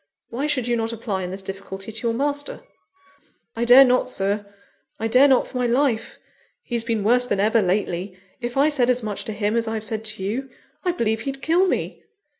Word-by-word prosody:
Why 270 +6 -2
should 260 -5 0
you 240 - +1
not 225 0 -1
apply 215 -4 -3
in 180 - -4
this 190 +1 -6
difficulty 195 +1 -7
to 220 +2 -3
your 230 - +1
master?" 285 +2 -2 0.9
"I 235 +1 -1
dare 255 +3 +9
not, 250 0 +2
Sir; 200 -1 -2 0.5
I 225 - -1
dare 255 +5 +6
not 265 -2 +3
for 255 - -6
my 245 - +1
life. 245 -2 0 0.5
He's 235 -2 -2
been 225 -3 -1
worse 245 +3 +3
than 205 - 0
ever, 220 +3 +3
lately; 185 -1 -1 0.2
if 240 +1 -5
I 280 +2 +5
said 265 -5 +1
as 250 -1 +1
much 210 -2 -4
to - - -4
him 210 +1 -1
as 230 -1 0
I've 220 -1 -3
said 220 0 -2
to 215 -3 -1
you, 245 +7 -3 0.3
I 360 - +1
believe 220 -9 -1
he'd 270 +1 -5
kill 350 +4 +3
me!" - - -2
230 Hz, 215 wpm, -23 LUFS, 210-255 Hz, 0.9 s, dare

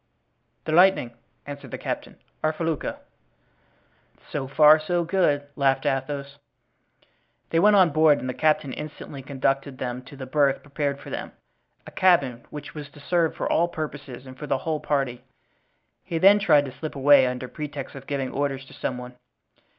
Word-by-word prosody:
"The - - -2
Lightning," 175 -8 +4 0.3
answered 145 0 -8
the - - -5
captain, - - -5 0.3
"our 155 - +3
felucca." 160 -2 -3 1.3
"So 140 -3 -3
far, 150 +3 +6
so 175 +3 0
good," 165 -5 +1
laughed 135 -2 +1
Athos. 140 +1 -2 1.1
They 165 - +3
went 210 +3 +6
on 185 -5 +5
board 155 -1 +5
and 130 - -5
the 130 - -2
captain 150 -3 +1
instantly 150 -2 -8
conducted 135 0 -1
them 125 -1 -4
to 140 - -12
the 135 -1 -7
berth 140 0 +1
prepared 140 -1 -2
for - - -10
them—a - - -11
cabin 140 -10 +2
which 150 -1 -8
was 150 -2 -8
to 145 - -16
serve 165 +2 0
for - - -2
all 170 - +2
purposes 145 -6 -7
and 130 0 -11
for 150 +3 -8
the 135 - +1
whole 155 +3 -2
party; 135 -5 -1 0.8
he 165 - -3
then 195 +5 +6
tried 150 -7 +4
to 135 - -6
slip 140 +5 -7
away 140 -1 +6
under 125 0 -4
pretext 145 -1 -6
of 135 -1 -11
giving 135 -2 -2
orders 135 -1 -2
to - - -16
some 125 - -3
one. 125 0 -8
145 Hz, 170 wpm, -25 LUFS, 135-155 Hz, 1.3 s, far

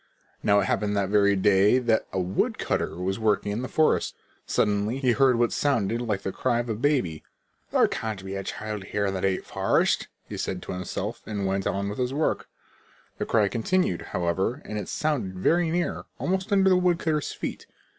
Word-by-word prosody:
Now 100 0 +4
it - - 0
happened 105 +1 0
that 100 -1 0
very 100 -1 +4
day 100 +3 +4
that 120 -3 +1
a 95 - -1
woodcutter 90 +1 -1
was 95 +3 -2
working 105 -2 +1
in 105 +4 -2
the 130 - -3
forest. 155 +3 +2 0.3
Suddenly 105 +4 +1
he 130 -2 +2
heard 130 +1 +4
what 120 0 +2
sounded 115 -5 +1
like 105 -5 -2
the 95 - -2
cry 125 +2 0
of 120 0 -2
a - - +1
baby. 110 - 0 0.5
"There - - +4
can't 110 -4 -4
be 95 - -5
a 100 0 -3
child 105 0 -5
here 105 +1 -1
in 95 - 0
the 95 - -3
deep 95 -1 0
forest," - - +1 0.2
he - - -6
said - - -3
to - - -6
himself 95 +5 -4
and 100 -2 -2
went 95 0 0
on 100 0 -1
with 105 +4 -5
his 125 +1 -1
work. 155 - 0 0.7
The - - -2
cry 110 -3 +3
continued, 115 - 0
however, 95 - -1
and 105 - -4
it - - -6
sounded 130 -12 -1
very 165 - +2
near, 175 +1 -1
almost 190 +3 -1
under 195 -1 +4
the 185 - +5
woodcutter's 170 -4 +1
feet. - - -6
105 Hz, 195 wpm, -26 LUFS, 95-130 Hz, 0.7 s, the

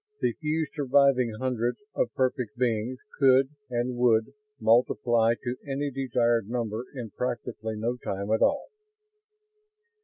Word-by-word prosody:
The - - +1
few 155 0 -1
surviving 140 -4 +3
hundreds 125 -2 -1 0.2
of 120 - 0
perfect 125 -4 -1
beings 120 0 0 0.2
could 135 -1 +5 0.2
and 125 0 -1
would 115 -3 +3 0.3
multiply 115 0 +3
to 120 0 -2
any 140 +1 -2
desired 120 -4 +1
number 115 -1 -3
in 120 -5 -6
practically 120 -3 -4
no 115 +3 -2
time 100 -2 -4
at 110 - +2
all. 285 - +2
120 Hz, 125 wpm, -27 LUFS, 115-130 Hz, 0.3 s, could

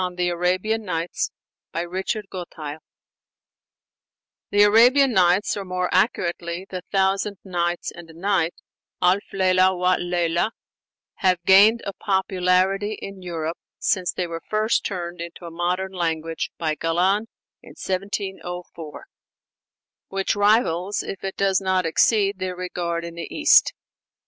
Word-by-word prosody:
THE 180 0 0
ARABIAN 185 +6 0
NIGHTS 170 -3 -2 0.4
BY 170 - -1
RICHARD 190 +4 -3
GOTTHEIL 160 -4 -7 1.7
The 205 0 +5
Arabian 245 +6 +6
Nights 185 +1 +3
or, 200 - -4
more 180 -1 -2
accurately, 175 -3 0
'The 185 -1 -5
Thousand 195 +1 +1
Nights 175 -2 -2
and 175 -1 -12
a 160 - -14
Night' 185 -3 +1 0.4
(Alf 185 +3 +3
Leilah 185 -1 +3
wa 180 0 +2
leílah) 175 +1 0 0.7
have 185 -3 +3
gained 210 +5 +6
a 200 - -4
popularity 190 +1 +1
in 195 -1 -8
Europe, 165 -2 -4 0.2
since 185 -3 0
they 180 - -2
were 165 -1 -6
first 215 +1 +1
turned 175 -3 -4
into 170 +1 -8
a 170 - -7
modern 180 +3 -1
language 165 -3 -2
by 160 -2 -1
Galland 180 +7 +1 0.3
in - - -14
1704, 185 -4 -5 1.0
which 195 +2 -1
rivals, 205 -3 +2
if 195 - -7
it 195 0 -4
does 195 -1 +2
not 185 -1 +1
exceed, 200 +4 +2
their 185 -1 -3
regard 175 -2 -3
in 170 - -7
the 170 - -6
East. 310 0 +5
185 Hz, 130 wpm, -23 LUFS, 175-195 Hz, 1.7 s, Arabian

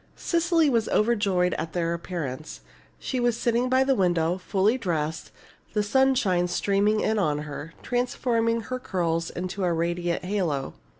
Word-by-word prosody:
Cecily 335 -2 +2
was 230 -5 +1
overjoyed 205 -5 +2
at 160 -1 -4
their 170 -1 0
appearance. 160 -5 -5 0.4
She 260 - -3
was 240 -1 +1
sitting 240 +2 +1
by 260 +1 +4
the 270 0 +2
window, 175 -4 +1
fully 195 +4 +1
dressed, 165 -8 -2 0.4
the 210 0 +1
sunshine 205 -7 +2
streaming 205 +4 +1
in 220 0 +1
on 150 -5 0
her, 150 +2 -8
transforming 240 -2 0
her 255 +4 -5
curls 165 -6 -1
into 185 +2 -4
a 180 - +2
radiant 170 +1 -1
halo. 175 -9 -1
195 Hz, 145 wpm, -26 LUFS, 170-235 Hz, 0.4 s, by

